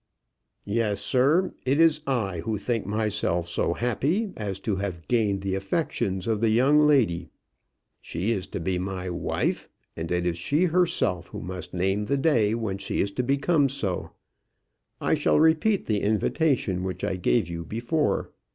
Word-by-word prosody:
"Yes, 105 -1 0
sir. 145 +9 +2
It 135 +3 +1
is 160 -2 +4
I 105 -10 -1
who 105 +6 -2
think 115 +2 -2
myself 105 -5 0
so 85 0 0
happy 160 - 0
as 100 -3 -4
to 100 -2 -1
have 90 -4 -5
gained 105 -5 +1
the 95 -1 -1
affections 95 - -1
of 110 -2 0
the 115 - +3
young 130 +7 +4
lady. 115 - +2 0.7
She 90 +8 -2
is 95 -4 -2
to - - -5
be 90 +2 -1
my 95 -1 -4
wife, 85 - -2 0.3
and 80 +1 -5
it 90 0 0
is 85 -1 -1
she 145 - +1
herself 160 - +1
who - - -8
must 90 -1 -6
name 95 +3 0
the 140 +5 0
day 120 -8 +2
when 105 -4 -3
she 100 - -1
shall 100 +5 -3
become 140 +3 +2
so. 100 -9 -2 0.9
I - - +1 0.2
repeat 160 +6 +3
the 105 -2 0
invitation 110 - +1
which 95 -1 -4
I 95 - 0
gave 95 +2 +1
you 85 -1 -5
before. 120 - -1
105 Hz, 160 wpm, -26 LUFS, 95-135 Hz, 0.9 s, is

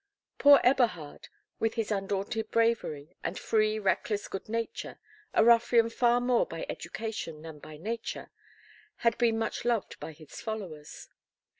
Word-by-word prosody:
Poor 285 0 +8
Eberhard, 230 - +1 0.3
with 225 0 0
his 225 -2 -2
undaunted 200 +2 -2
bravery 225 -11 0
and 180 - -3
free 215 -1 +1
reckless 205 +1 0
good 195 - -6
nature, 230 0 -4 0.3
a - - +4
ruffian 230 0 +5
far 240 0 +3
more 245 0 +2
by 165 0 -5
education 175 -4 -5
than 160 -2 -9
by 155 +1 -11
nature, 225 +8 -5 0.7
had 230 0 +4
been 230 -2 +3
much 225 -1 -2
loved 235 -4 -1
by - - -6
his 155 -1 -12
followers. 185 -10 -6
220 Hz, 140 wpm, -29 LUFS, 175-230 Hz, 0.7 s, Poor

